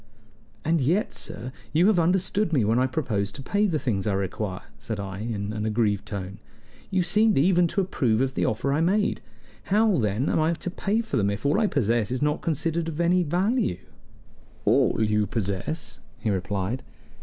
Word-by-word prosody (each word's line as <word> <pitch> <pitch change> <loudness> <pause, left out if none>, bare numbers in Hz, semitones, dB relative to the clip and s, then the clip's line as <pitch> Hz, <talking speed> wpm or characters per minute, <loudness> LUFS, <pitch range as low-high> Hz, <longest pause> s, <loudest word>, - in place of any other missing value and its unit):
"And 165 0 +2
yet, 175 - +1
sir, 125 - -6 0.2
you 165 +4 +4
said 210 -2 +4
you - - +4
understood 190 +3 +1
me 130 -9 +2
when 115 +3 +2
I 130 - +3
proposed 105 -8 -2
to 135 - -6
pay 205 +8 +1
for 180 - -2
the - - +2
things 110 -9 -1
I 105 - +1
require," 95 0 -3 0.2
said 110 -2 -5
I, 95 -1 -5
in 105 -2 -3
an 105 -1 -3
aggrieved 105 -2 0
tone. 100 0 -6 0.5
"You 190 -2 +1
seemed 215 +4 +3
even 175 +4 +4
to 195 - 0
approve 125 - +1
of 130 0 0
the - - -1
offer 140 +6 0
I 150 - +1
made. 200 +5 +1 0.4
How, 210 -3 +3
then, 110 +5 0
am - - +1
I 160 +2 +2
to 175 +2 -5
pay 205 +4 0
for 230 - -3
them 100 -2 +2
if 100 +5 -4
all 145 +8 +3
I 220 - +3
possess 115 - +1
is 130 +1 -1
not 150 0 0
considered 165 +1 -1
of 160 0 -6
any 175 +1 +3
value?" 180 - +1 0.9
"All - - +3
you 105 -1 +1
possess!" 110 - -3 0.2
he 110 -2 -1
replied. 100 +5 -2
135 Hz, 200 wpm, -25 LUFS, 105-175 Hz, 0.9 s, you